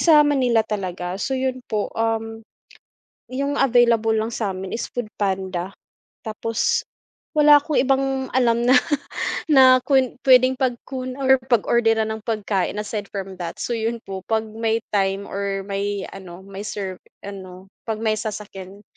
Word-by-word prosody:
sa 305 -3 +6
Manila 250 -6 +2
talaga, 180 -3 -4
so - - -2
yun 260 -1 -2
po, 210 -1 -2
um, 225 0 -2 0.9
yung 280 +2 -2
available 235 -4 +4
lang 220 +2 -1
sa'min 190 -4 -3
is 230 - -3
Foodpanda 190 -5 -3 0.5
tapos 225 +1 0 0.6
wala 295 0 +8
akong 305 -2 0
ibang 270 0 +1
alam 235 -2 +2
na 255 - +6 0.7
na 260 -4 +7
kwen 260 -3 +2
pwedeng 255 +1 +6
pagkun 255 0 -3
or 265 -1 +3
pag 240 -4 +3
orderan 225 -2 +2
ng 220 - -4
pagkain 205 -4 -1
aside 210 -1 -4
from 190 -2 -6
that, 170 -2 -5
so - - -4
yun 230 0 -1
po 190 -1 -6
pag 220 0 +1
may 225 +1 -2
time 195 0 +1
or 195 0 -3
may 200 0 -3
ano, 185 -1 -10
may 195 0 -8
serve 190 -3 -5 0.2
ano, 190 -1 -10 0.2
pag 220 - -1
may 220 -1 +2
sasakyan 205 -2 -7
220 Hz, 145 wpm, -22 LUFS, 195-255 Hz, 0.9 s, wala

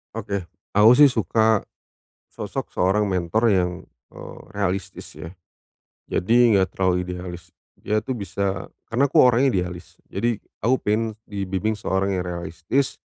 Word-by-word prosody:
Oke. 100 -1 -3 0.3
Aku 105 +3 +7
sih 145 - +9
suka 110 -3 +2 0.7
sosok - - -5
seorang 100 +3 +2
mentor 95 +5 +1
yang, 90 -4 +2 0.4
eee, - - -10
realistis 95 -2 -4
ya. 80 - -8 0.8
Jadi 115 +2 +4
nggak 95 -1 +1
terlalu 90 -1 +1
idealis. 90 -1 -8 0.2
Dia 105 0 -1
itu 125 +3 -4
bisa 100 -1 -3 0.2
karena 125 +4 +2
aku - - +4
orangnya 125 +2 +4
idealis. 90 0 -8
Jadi 115 +2 -1 0.2
aku 125 +3 +4
pengen 110 +1 0 0.2
dibimbing 100 +2 -2
seorang 95 -1 -1
yang 90 - -2
realistis 85 +9 -2
100 Hz, 135 wpm, -23 LUFS, 90-110 Hz, 0.8 s, sih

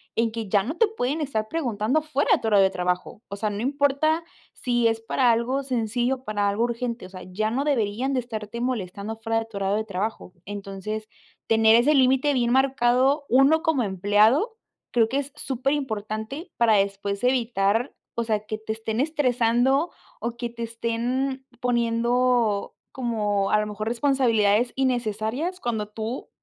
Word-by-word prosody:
en 230 -1 +1
que 225 -2 -5
ya 200 -1 +3
no 300 +9 -5
te 455 - +4
pueden 315 - -2
estar 220 -7 -2
preguntando 255 -2 0
fuera 300 -2 -1
de - - +3
tu 225 - -2
horario 205 -3 +5
de 190 - +4
trabajo, 180 +3 -2
o 200 - -5
sea, 215 +1 -1
no 205 - -4
importa 285 +5 +1 0.3
si 240 -2 +1
es 225 0 0
para 240 +1 +2
algo 250 +4 0
sencillo 245 0 0
o 260 - -16
para 205 -1 0
algo 210 +4 0
urgente, 235 -1 -3
o - - -11
sea, 185 -1 -10
ya 215 +4 -1
no 270 +4 0
deberían 250 0 0
de 255 - +1
estarte 225 -1 -6
molestando 220 -3 -3
fuera 225 0 -1
de 225 - -4
tu 220 -3 -9
horario 195 +1 0
de 220 - -1
trabajo. 195 -1 -4
Entonces, 205 +2 -5 0.4
tener 225 0 +5
ese 250 +6 +4
límite 265 +2 +4
bien 240 -2 +1
marcado 265 +2 +3
uno 270 +5 +5
como 310 -7 +2
empleado, 210 - +2 0.3
creo 225 -2 +3
que 275 - -1
es 280 0 -5
superimportante 265 - -3
para 230 -2 +4
después 200 +1 -1
evitar, 230 -2 +1 0.2
o 235 - 0
sea, 215 -2 -1
que 215 0 -4
te 220 0 -4
estén 220 +2 -2
estresando 265 0 +2 0.3
o 235 0 -4
que 240 -1 -3
te 235 0 -7
estén 245 +4 -2 0.2
poniendo, 235 -2 +1 0.2
como 210 -5 -1
a 210 - +4
lo 210 - -1
mejor, 215 +1 -5
responsabilidades 235 -3 +2
innecesarias 250 - -1
cuando 220 -6 -2
tú 220 +4 -5
235 Hz, 175 wpm, -25 LUFS, 215-265 Hz, 0.4 s, horario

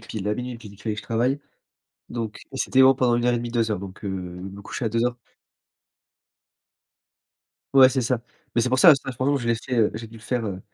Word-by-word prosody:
pile 110 -3 -6
à 105 - +1
00:00 125 +1 -5
pile 105 -3 -12
qu'il 100 - -17
fallait 110 -2 -2
que - - -4
je - - -17
travaille. 120 +5 0 0.7
Donc, 115 -3 -5
c'était 130 0 +2
bon 130 0 +7
pendant 125 -2 +2
une 120 - 0
1 - - +1
heure 120 - +3
et - - +1
demi, 120 0 -4
2 115 -2 0
heures. 105 - 0
Donc, 95 0 -9
heu, 100 - -3
me 95 +1 -6
couchais 120 - -4
à - - +2
2:00 120 +2 0 2.6
Ouais, 130 -1 +9
c'est 130 0 0
ça. 120 0 0 0.3
Mais, 120 - +3
c'est - - +1
pour 130 +1 +1
ça, 155 +3 +9
ce 135 - -4
taff 135 - -5
franchement 140 +3 +1
je 120 -4 -3
l'ai 115 - +3
fait, 125 +2 -4
heu 110 -3 +4
j'ai 115 +1 -6
dû 110 - -15
le 110 - -14
faire, 120 -1 -2
heu, 95 -2 -5
115 Hz, 250 wpm, -24 LUFS, 105-125 Hz, 2.6 s, Ouais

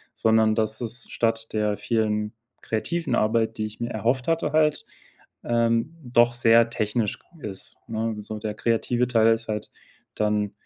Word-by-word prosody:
sondern 110 -1 +3
dass 110 +1 -1
es 120 +1 -3
statt 115 -1 -1
der 105 -1 0
vielen 105 -2 0 0.3
kreativen 165 +10 -1
Arbeit, 110 +1 +1
die 110 - -1
ich 110 - -13
mir 120 0 -2
erhofft 120 +3 0
hatte 165 -2 +1
halt, 155 0 +2 0.6
ähm, 115 +5 +1
doch 120 -1 +3
sehr 115 -1 +5
technisch 110 -1 -1
g 160 -10 -11
ist, 95 -2 -6
ne? 110 -1 -2
So, 110 +1 -6
der 105 0 -3
kreative 120 +2 +1
Teil 115 -2 +4
ist 115 0 -3
halt 105 -1 -3 0.5
dann, 105 -1 0
115 Hz, 160 wpm, -25 LUFS, 110-120 Hz, 0.6 s, sehr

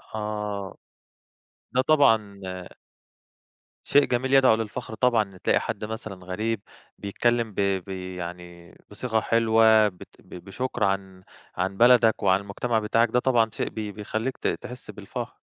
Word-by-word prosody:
آه، 105 -2 -4 1.0
ده 130 - +4
طبعًا 115 -9 +3 1.4
شيء 145 0 +4
جميل 130 +2 -1
يدعو 130 -4 +6
للفخر 110 +1 -5
طبعًا 120 -2 +3
إن 95 -2 -16
تلاقي - - +2
حد 105 -1 -4
مثلًا 105 -4 -7
غريب 105 +4 -2 0.4
بيتكلم 115 +2 0
ب - - -23
بي 95 -1 -2
يعني 85 0 -9
بصيغة 110 +2 -1
حلوة 110 -1 +4
بت 90 -3 -11
بشُكَر 105 +6 -5
عن، 95 -1 -2 0.3
عن 95 +1 -2
بلدك 120 -2 +5
وعن 95 0 +3
المجتمع 110 +3 -1
بتاعك 115 +2 +2
ده 125 - +2
طبعًا 120 -3 +2
شيء - - -3
بي 105 -2 -5
بَيخَلّيك 110 +5 -4
ت - - -2
تحس 125 0 -5
بالفخر. - - -7
110 Hz, 135 wpm, -25 LUFS, 95-120 Hz, 1.4 s, يدعو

